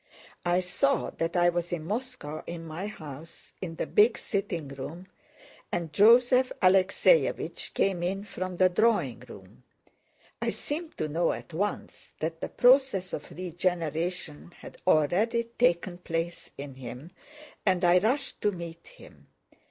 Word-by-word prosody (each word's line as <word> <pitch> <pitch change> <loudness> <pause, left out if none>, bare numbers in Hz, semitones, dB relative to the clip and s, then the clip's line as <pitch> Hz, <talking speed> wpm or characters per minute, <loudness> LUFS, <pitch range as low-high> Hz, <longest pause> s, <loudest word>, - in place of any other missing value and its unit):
I 175 +1 +3
saw 275 +10 0
that 165 +1 -3
I 175 0 +5
was 175 0 -2
in 175 -3 -2
Moscow 215 - -4
in 170 -1 -6
my 165 +5 -5
house, 160 -5 -10
in 170 -3 -5
the - - -2
big 220 +3 +4
sitting 185 -8 -3
room, 145 +6 -7 0.7
and 170 -3 -3
Joseph 250 - +6
Alexéevich 190 - +3
came 190 -3 +1
in 190 +3 -2
from 185 -3 -5
the 185 - +6
drawing 180 - +2
room. 100 +2 -13 0.8
I - - 0
seemed 315 +2 -5
to 155 - -1
know 165 +3 +1
at - - -9
once 205 +6 -4
that 165 +1 -3
the - - -3
process 245 -7 +4
of 150 - -5
regeneration 175 -2 -3
had - - -12
already 190 +9 +3 0.2
taken 175 -5 +2
place 165 0 -3
in 140 -1 -7
him, 130 +5 -9 0.5
and 185 -2 +2
I 175 +1 +6
rushed 265 +8 -1
to 210 - +2
meet 170 -3 -8
him. - - -16
175 Hz, 145 wpm, -28 LUFS, 165-210 Hz, 0.8 s, Joseph